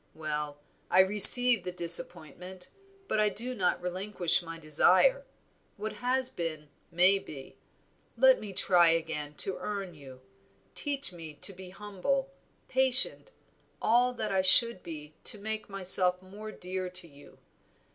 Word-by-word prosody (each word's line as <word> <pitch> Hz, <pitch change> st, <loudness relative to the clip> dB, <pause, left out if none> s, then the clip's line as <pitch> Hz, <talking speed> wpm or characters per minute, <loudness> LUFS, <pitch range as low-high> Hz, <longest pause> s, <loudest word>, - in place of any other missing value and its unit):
Well, 150 Hz, -2 st, -6 dB, 0.3 s
I 185 Hz, -, +4 dB
receive 210 Hz, +3 st, +8 dB
the 180 Hz, -, -6 dB
disappointment, 175 Hz, +1 st, -1 dB, 0.4 s
but -, -, -3 dB
I 210 Hz, 0 st, +1 dB
do 235 Hz, +5 st, -7 dB
not 190 Hz, -7 st, -2 dB
relinquish 180 Hz, -1 st, -2 dB
my 165 Hz, -1 st, -10 dB
desire. -, -, +1 dB, 0.5 s
What 215 Hz, 0 st, -7 dB
has 250 Hz, +4 st, -3 dB
been 155 Hz, -, -8 dB, 0.2 s
may 180 Hz, +3 st, +2 dB
be; 140 Hz, -7 st, -13 dB, 0.6 s
let -, -, +3 dB
me 205 Hz, -, -10 dB
try 180 Hz, -2 st, +1 dB
again 160 Hz, -3 st, -4 dB
to 190 Hz, -, -1 dB
earn 200 Hz, -3 st, -7 dB
you; 135 Hz, -4 st, -16 dB, 0.5 s
teach 280 Hz, -, -5 dB
me 160 Hz, -3 st, -12 dB
to 195 Hz, +7 st, -2 dB
be 185 Hz, 0 st, -13 dB
humble, 210 Hz, +8 st, -5 dB, 0.4 s
patient, 260 Hz, -, +3 dB, 0.5 s
all 245 Hz, +3 st, 0 dB
that 220 Hz, -4 st, -6 dB
I 190 Hz, -1 st, 0 dB
should 190 Hz, +2 st, +4 dB
be 155 Hz, -2 st, -11 dB
to -, -, +1 dB
make 215 Hz, +1 st, -7 dB
myself 185 Hz, -2 st, +2 dB
more 205 Hz, +4 st, -12 dB
dear 185 Hz, -1 st, -7 dB
to 180 Hz, -1 st, -5 dB
you. 145 Hz, -2 st, -20 dB
185 Hz, 140 wpm, -27 LUFS, 165-215 Hz, 0.6 s, receive